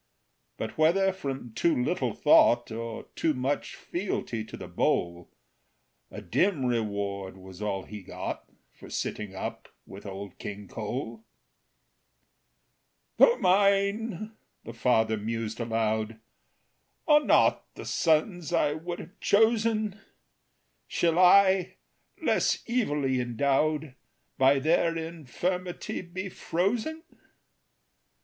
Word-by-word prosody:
But - - -5
whether 190 +5 +4
from 135 - -5
too 165 +8 +2
little 125 - -1
thought, 120 0 +5
Or 115 0 -5
too 155 -3 +1
much 130 +3 -2
fealty 170 - -3
to - - -9
the - - -8
bowl, 85 0 -1 0.8
A - - -9
dim 175 -9 +1
reward 100 -5 -2
was 95 +1 -12
all 100 -2 -2
he 105 -1 -9
got - - -6 0.2
For - - -14
sitting 105 -2 -4
up 95 - -6 0.2
with 100 +2 -10
Old 100 0 -8
King 100 -1 -7
Cole. 125 - -5 1.9
"Though 480 - +6
mine," 200 +2 +2 0.3
the 115 - -8
father 110 -2 +2
mused 115 +1 -4
aloud, 110 -1 -1 0.9
"Are 300 -1 +6
not - - +3
the - - -8
sons 165 +1 +1
I 145 -1 +2
would 170 +3 -5
have 175 - -12
chosen, 215 -1 +2 0.9
Shall 170 0 +1
I, 190 0 +5 0.4
less - - +1
evilly 145 - 0
endowed, 140 +4 0 0.5
By 135 +1 +5
their 165 +3 +2
infirmity 170 +3 -4
be 185 +2 -6
frozen? 220 - -2
145 Hz, 110 wpm, -28 LUFS, 110-185 Hz, 1.9 s, Though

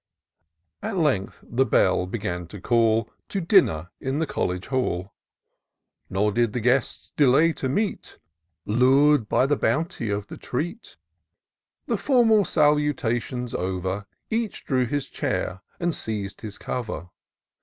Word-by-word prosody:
At 195 - -3
length 135 - 0
the 125 +3 +1
bell 95 -7 +2
began 90 -4 -4
to 100 +4 -10
call 115 +1 +2 0.2
To 200 - -2
dinner, 165 - +3
in 135 +2 -2
the 160 - +1
coUege 90 - -2
hall; 100 -8 -2 1.0
Nor 105 +3 +1
did 115 0 +1
the 125 - -1
guests 125 +3 0
delay 150 +4 +5
to 130 - -3
meet, 205 +9 -2 0.5
Lur*d 130 +4 +4
by 130 - +3
the 145 +2 +2
bounty 150 -8 -1
of 100 0 -2
the - - -10
treat. 165 - -5 0.9
The - - 0
formal 225 -7 +4
salutations 130 -5 +1
over. 95 +2 -2 0.2
Each 225 -2 -2
drew 130 -3 +1
his 145 +2 -1
chair 95 -7 -3 0.2
and 170 -1 0
seized 105 -6 -4
his 105 -2 -6
cover. 110 -8 -5
125 Hz, 135 wpm, -25 LUFS, 100-150 Hz, 1.0 s, delay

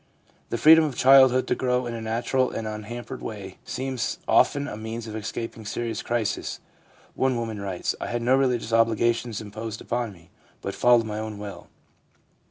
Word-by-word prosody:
The - - -1
freedom 160 +6 +8
of 145 -5 -2
childhood 130 -1 +6
to - - +1
grow 125 -1 0
in 120 - -4
a 115 - -5
natural 120 +3 0
and 110 - -4
un 105 0 -5
hampered 120 +3 -7
way 100 -4 -7
seems 130 -1 -3
often 145 0 +3
a 105 - -5
means 110 +1 -6
of 110 -1 -7
escaping 110 +1 -5
serious 115 +1 -3
crises. 115 -3 -2 0.5
One 130 -1 +1
woman 110 -3 -4
writes: 95 -3 -2
' - - -16
I - - -3
had 120 0 -2
no 125 +2 +4
religious 125 -4 +1
obliga 115 +1 +3
tions 115 -2 -5
imposed 110 +1 -6
upon 120 -2 -2
me, 85 -3 -18 0.3
but 100 - -4
followed 120 -2 +4
my 105 0 -4
own 110 -1 -5
will. 100 -1 -8
115 Hz, 185 wpm, -25 LUFS, 110-125 Hz, 0.5 s, freedom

